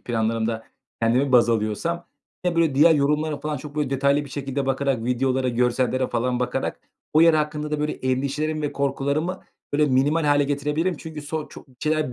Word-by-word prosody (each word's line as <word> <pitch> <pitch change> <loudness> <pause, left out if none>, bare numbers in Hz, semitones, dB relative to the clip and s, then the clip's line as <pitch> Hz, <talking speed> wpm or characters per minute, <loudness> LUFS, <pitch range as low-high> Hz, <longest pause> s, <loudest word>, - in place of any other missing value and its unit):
planlarımda 115 -1 -1 0.4
kendimi 130 +4 +2
baz 120 -1 +6
alıyorsam, 115 +11 -1 0.4
ya, 175 -1 0
böyle, 160 -5 +3
diğer 160 +3 +6
yorumlara 150 +1 +1
falan 150 -1 -2
çok, 145 +2 -9
böyle, 145 -3 0
detaylı 140 +2 +2
bir 140 - -12
şekilde 135 -1 -3
bakarak, 135 -3 0
videolara, 130 +1 +1
görsellere 125 +1 +1
falan 125 +1 -1
bakarak 125 - -2 0.3
o 155 - +5
yer 165 -1 +6
hakkında 150 0 -1
da, 150 -1 -1
böyle, 150 0 0
endişelerimi 140 +4 -1
ve 145 - -2
korkularımı, 140 +6 -1 0.3
böyle, 150 +1 +3
minimal 145 +5 +2
hâle 145 -1 +3
getirebilirim. 150 +5 -1
Çünkü 155 -1 -8
so 155 +1 -4
çok - - -13
bir 130 - -23
şeyler 155 -4 0
140 Hz, 180 wpm, -23 LUFS, 130-150 Hz, 0.4 s, baz